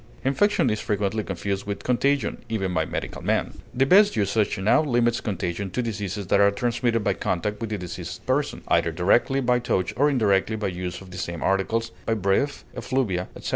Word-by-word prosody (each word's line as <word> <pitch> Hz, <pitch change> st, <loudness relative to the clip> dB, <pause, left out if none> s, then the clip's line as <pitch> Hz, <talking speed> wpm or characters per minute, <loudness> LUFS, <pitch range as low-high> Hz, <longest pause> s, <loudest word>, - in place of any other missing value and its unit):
Infection 205 Hz, +10 st, +2 dB
is 105 Hz, -, -1 dB
frequently 105 Hz, +1 st, -1 dB
confused 100 Hz, +1 st, -3 dB
with 100 Hz, -1 st, -4 dB
contagion, 135 Hz, 0 st, 0 dB
even 95 Hz, -5 st, -1 dB
by -, -, +1 dB
medical -, -, -5 dB
men. -, -, -1 dB
The 135 Hz, +2 st, +2 dB
best 200 Hz, +7 st, +5 dB
usage 105 Hz, 0 st, +1 dB
now 95 Hz, +10 st, +3 dB
limits 120 Hz, -5 st, +1 dB
contagion 95 Hz, -1 st, -3 dB
to 125 Hz, +7 st, -2 dB
diseases 105 Hz, -3 st, -4 dB
that 100 Hz, +2 st, +2 dB
are 100 Hz, 0 st, +6 dB
transmitted 120 Hz, +2 st, 0 dB
by -, -, +2 dB
contact 105 Hz, +4 st, -2 dB
with 115 Hz, -, -3 dB
the 105 Hz, -, -2 dB
diseased 90 Hz, -2 st, -7 dB
person, -, -, -1 dB
either 85 Hz, -, +2 dB
directly 100 Hz, +11 st, +2 dB
by 125 Hz, -1 st, +2 dB
touch 100 Hz, -5 st, -1 dB
or 145 Hz, +3 st, +3 dB
indirectly 110 Hz, -5 st, +2 dB
by 105 Hz, -2 st, -2 dB
use 90 Hz, 0 st, -5 dB
of 95 Hz, -1 st, -12 dB
the 95 Hz, -, -7 dB
same 85 Hz, -2 st, -4 dB
articles, 115 Hz, +4 st, 0 dB, 0.2 s
by 115 Hz, -, +2 dB
breath, 105 Hz, +8 st, 0 dB
effluvia, 105 Hz, -9 st, -1 dB
etc. -, -, -6 dB
105 Hz, 190 wpm, -24 LUFS, 95-120 Hz, 0.2 s, are